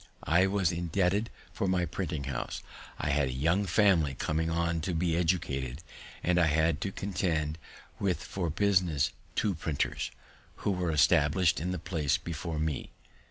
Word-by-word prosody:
I 90 +4 +4
was 95 -3 +1
indebted 90 +5 0 0.2
for 100 - -1
my 90 -1 +2
printing 80 -3 -3
house; 65 -3 -4 0.3
I 75 - -1
had 70 -1 +2
a - - -2
young 85 +10 +1
family 90 -7 +3
coming 80 +4 -1
on 85 0 0
to 85 +2 -2
be 85 0 +1
educated, 75 -5 -1 0.4
and 90 0 +3
I 85 - +4
had 80 +1 +2
to 100 - -2
contend 85 -6 -1 0.4
with 95 -3 0
for 90 -4 -3
business 90 -4 +2 0.2
two 105 -3 +1
printers, 80 -3 -2 0.6
who 105 - +3
were 90 -2 -1
established 75 +2 +4
in 85 +4 -2
the 90 - -2
place 75 -5 0
before 85 -1 -5
me. 75 -3 -2
85 Hz, 160 wpm, -30 LUFS, 75-90 Hz, 0.6 s, I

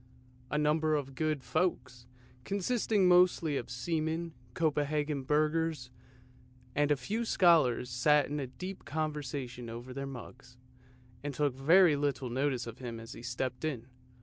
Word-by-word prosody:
A 150 - -1
number 155 +1 +2
of 135 -2 -3
good 155 -1 -1
folks, 130 -8 -2 0.4
consisting 205 - +1
mostly 180 -4 +4
of 120 - -3
seamen, 160 +6 -2 0.2
Copenhagen 150 -2 0
burghers, 150 -1 0 0.8
and 145 0 +2
a 145 - +4
few 210 - -3
scholars, 165 - +4
sat 145 +4 +4
in 140 -3 -4
deep 185 +1 -6
conversation 140 -5 -4
over 120 +3 -7
their 140 +1 -4
mugs, 125 -1 -10 0.7
and 145 -2 -4
took 145 -2 +1
very 160 +4 +5
little 140 -3 -1
notice 130 -1 0
of 115 -1 -9
him 120 -3 -6
as 115 +3 -9
he - - -10
stepped 125 +1 -3
in. 135 -7 -2
145 Hz, 140 wpm, -31 LUFS, 125-160 Hz, 0.8 s, very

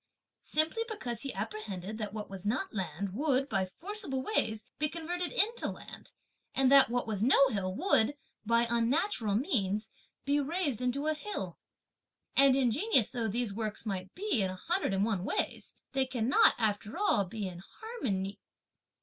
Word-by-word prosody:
Simply 315 +8 +1
because 240 - -4
he 275 - -3
apprehended 215 -1 -5
that 210 -2 -3
what 210 0 -5
was 195 -1 -8
not 245 - -1
land, 185 0 -3
would, 275 +2 +1
by 190 -8 0
forcible 300 - -2
ways, 220 - +1
be 300 0 +2
converted 340 +2 -3
into 455 +4 +1
land; - - -10 0.4
and 265 -1 +3
that 275 -3 +8
what 245 +1 0
was 215 -3 -3
no 265 +3 +5
hill 190 -5 -2
would, 290 - +3 0.3
by 230 +2 +3
unnatural 235 - +1
means, 215 - 0 0.3
be 285 +1 +2
raised 290 - -1
into 250 +4 -1
a 310 - +2
hill. 410 +7 -5 0.8
And 275 -1 +6
ingenious 265 - +3
though 235 -2 -1
these 225 0 -1
works 215 +1 -3
might 190 -3 -4
be 385 - 0
in 190 - +1
a 185 - -5
hundred 340 - -1
and 195 +2 +2
one 200 -5 -1
ways, 310 - -2 0.2
they 265 -1 +1
cannot, 255 +1 +4
after 215 +2 -1
all, 400 - +3
be 205 +1 -4
in 175 -2 -8
harmony."... 200 - -4
235 Hz, 165 wpm, -31 LUFS, 205-295 Hz, 0.8 s, that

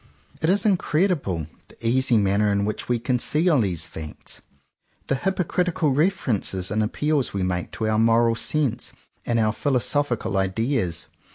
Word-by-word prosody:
It 160 - +1
is 200 +2 +2
incredible, 165 - +1 0.2
— - - -34
the 115 - -7
easy 130 0 +3
manner 100 +1 +2
in 100 0 +1
which 105 +3 -4
we 120 - +2
conceal 135 +6 +1
these 90 -6 -1
facts, 80 -1 -8 0.6
the - - 0
hypo 190 +5 0
critical 175 -2 0
references 130 - 0
and 110 +1 +1
appeals 140 +4 0
we 95 - 0
make 90 -1 -2
to 110 - -2
our 110 0 +2
moral 115 +1 +4
sense 125 0 -1 0.3
and 115 -1 +2
our 110 -1 +2
philosophical 130 -4 0
ideas. 95 - -1
120 Hz, 155 wpm, -24 LUFS, 105-150 Hz, 0.6 s, moral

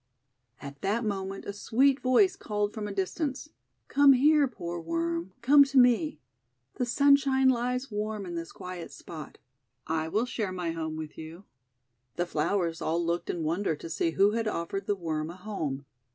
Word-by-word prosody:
At 140 0 -10
that 215 +4 0
moment 195 -1 -3
a 200 - -4
sweet 260 +7 +2
voice 370 +10 +4
called 210 - -2
from 215 -2 -4
a - - -5
distance: 260 - -3 0.2
— - - -50
'Come 285 -1 +6
here, 290 +2 +4
poor 175 -8 -6
Worm, 165 +2 -2
come 285 +3 +8
to 275 0 -2
me. 250 +5 +4 0.6
The 250 - -1
sunshine 275 0 +4
lies 250 +1 -1
warm 210 -1 -3
in 175 - -6
this 165 -1 -5
quiet 180 -2 -8
spot. 160 -3 -10 0.5
I 160 0 -1
will 215 +8 0
share 220 -5 -3
my 180 -2 -3
home 160 -1 -4
with 155 -1 -7
you." 160 +4 -9 0.7
The 175 - 0
flowers 170 +1 -1
all 170 +2 0
looked 170 +1 -2
in 170 - -2
wonder 165 +2 0
to 165 - -9
see 165 - 0
who 200 +2 +5
had 225 0 -1
offered 195 +1 -3
the 205 - +1
Worm 160 -4 -3
a 170 - -8
home. 155 -9 -4
200 Hz, 180 wpm, -28 LUFS, 170-250 Hz, 0.7 s, come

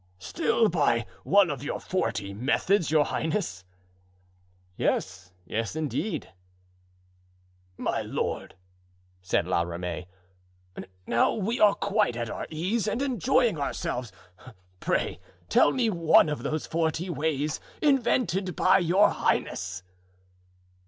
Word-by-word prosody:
"Still 225 - +1
by 140 - +1 0.2
one 195 -4 +4
of 140 -3 -5
your 145 - -3
forty 115 - -2
methods, 155 - +1
your 155 -1 +4
highness?" 160 - -2 1.1
"Yes, 90 0 -2
yes, 115 - -3
indeed." 155 - -3 1.5
"My - - -1
lord," - - -3 0.7
said 90 -1 0
La 90 -1 +1
Ramee, 85 +1 -4 1.0
"now 115 - +2
we 220 +3 -2
are 210 -1 +6
quite 205 - +1
at 120 -2 -3
our - - -5
ease 190 +8 -1
and 215 - -1
enjoying 255 - +1
ourselves, 125 -4 -3 0.7
pray - - -1 0.3
tell - - +5
me 250 -3 +1
one 170 -5 +4
of 150 - -3
those 155 0 -2
forty 160 +1 -1
ways 155 -2 -1 0.2
invented 235 - +1
by 190 +1 +4
your 185 +3 +4
highness." 90 0 -1
160 Hz, 110 wpm, -27 LUFS, -, 1.5 s, are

